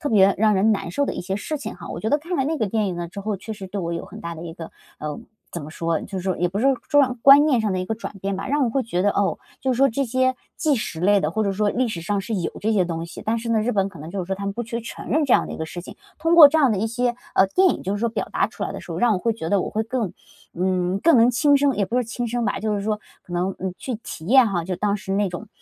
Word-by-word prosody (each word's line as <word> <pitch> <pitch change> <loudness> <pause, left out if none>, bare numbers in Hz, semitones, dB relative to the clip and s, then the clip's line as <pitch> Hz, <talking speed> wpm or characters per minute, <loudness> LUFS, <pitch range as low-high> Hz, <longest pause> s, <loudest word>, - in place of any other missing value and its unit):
特 295 - -2
别 195 -4 +5
让 215 0 +4
人 210 +3 +3
难 185 -4 -3
受 285 +10 0
的 - - -3
一 - - -4
些 190 +2 -3
事 305 +8 -4
情 280 - -6
哈。 - - -10
我 - - -5
觉 220 - -1
得 290 - +3
看 340 +3 -4
了 270 - +1
那 315 +3 -1
个 220 - +1
电 215 0 0
影 180 -2 -3
呢 175 0 -3
之 200 +4 -8
后， 210 0 -2
确 220 +4 -7
实 195 -2 -8
对 195 +1 -4
我 170 0 -3
有 170 - -4
很 - - -11
大 170 0 -5
的 160 - -9
一 165 -1 -7
个， 165 -2 -8 0.3
呃， 150 -1 -5 0.3
怎 170 - -5
么 150 - -8
说？ 165 0 -1
就 195 -2 -5
说 185 0 -1
也 175 0 +1
不 195 - -4
是 255 - +2 0.2
状 265 -4 +3
观 280 +2 +9
念 265 -7 +3
上 215 - 0
的 185 - -1
一 - - -2
个 220 - -2
转 220 - -7
变 195 +1 -2
吧， 195 - -5
让 285 0 +2
我 235 - 0
会 270 +3 0
觉 185 -6 -1
得， 205 - +3
哦， 200 -1 0 0.2
就 265 - 0
是 - - -2
说 275 +2 +5
这 275 +4 0
些 255 +2 +1 0.2
纪 305 -3 +2
实 195 -8 -4
类 200 +3 +4
的， 150 - 0
或 220 +4 -1
者 200 - 0
说 210 +1 +1
历 250 +4 +1
史 180 -6 -4
上 200 +4 -1
是 210 +4 -6
有 170 - -2
这 220 +3 +1
些 200 - +3
东 165 -1 -3
西， 170 - -9
但 225 +2 0
是 230 +1 -4
呢， 220 -1 +3
日 245 +3 0
本 195 -1 +1
可 170 - -13
能 155 - -8
就 195 - -3
是 - - -16
说 190 - -1
它 200 +1 -5
们 200 - -1
不 240 - -3
去 235 +1 -4
承 230 - -8
认 305 +1 +2
这 255 - +5
样 - - +3
的 - - -7
一 - - -6
个 160 - -3
事 175 +2 -7
情。 - - -11 0.2
通 330 +1 +2
过 310 -4 +11
这 320 - +1
样 270 -7 +4
的 195 - -1
一 220 - 0
些， 245 +1 0 0.2
呃， 190 - +5
电 375 - +4
影， - - -1
就 195 - -2
是 205 - -2
说 235 - +1
表 225 - -3
达 - - +2
出 - - -9
来 - - -2
的 - - -7
时 - - -12
候， - - -4
让 240 -2 +3
我 185 - +1
会 230 +4 0
觉 160 -7 -5
得 200 -2 +3
我 - - -3
会 220 - -1
更， 230 -4 -2 0.4
嗯， 185 +1 0
更 330 -5 +6
能 235 +2 +6
亲 285 +4 +4
身 280 -1 +3
也 200 - +2
不 210 - -6
是 250 - +3
说 - - -10
亲 240 +1 -3
身 240 0 -1
吧， 205 - -1
就 215 -1 0
是 200 - -3
说 210 0 -1 0.2
可 175 - -13
能， 180 +2 -1
嗯， 185 -1 -4
去 255 - -4
体 165 -7 -9
验 255 +3 +6
哈， 175 -4 -1
就 185 +1 -3
当 205 +1 0
时 195 -1 -5
那 200 0 +1
种， 200 +4 -7
210 Hz, 370 characters per minute, -23 LUFS, 185-245 Hz, 0.4 s, 过